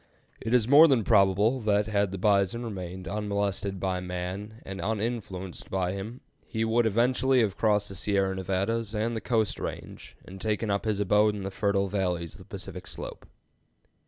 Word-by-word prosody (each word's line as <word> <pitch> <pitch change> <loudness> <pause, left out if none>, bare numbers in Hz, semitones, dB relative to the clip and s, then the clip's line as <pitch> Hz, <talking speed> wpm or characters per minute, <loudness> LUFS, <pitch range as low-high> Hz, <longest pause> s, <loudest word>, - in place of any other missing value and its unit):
It 110 - -3
is 120 -3 +4
more 145 +5 +9
than 130 -7 +3
probable 100 +4 +4
that 105 -2 +2
had 100 -2 +1
the 95 - -4
bison 100 +3 +2
remained 95 -4 -6
unmolested 100 -1 -2
by 95 0 -1
man 90 +4 -5
and 95 0 -6
uninfluenced 105 -5 -3
by 95 -2 0
him, 105 +6 -6 0.3
he 110 0 -1
would 115 +1 +2
eventually 125 +4 +3
have 105 -4 0
crossed 105 -2 +2
the - - -7
Sierra 95 0 0
Nevadas 100 +4 -1
and 115 +2 -1
the 110 - -3
Coast 110 -4 0
Range - - -7
and 95 +1 -10
taken 110 0 -1
up 100 +2 -1
his 105 -2 0
abode 105 +1 +3
in 100 - -5
the 95 - -4
fertile 100 0 +1
valleys 90 -4 -2
of - - -14
the - - -13
Pacific - - -8
slope. - - -7
100 Hz, 180 wpm, -28 LUFS, 95-110 Hz, 0.3 s, more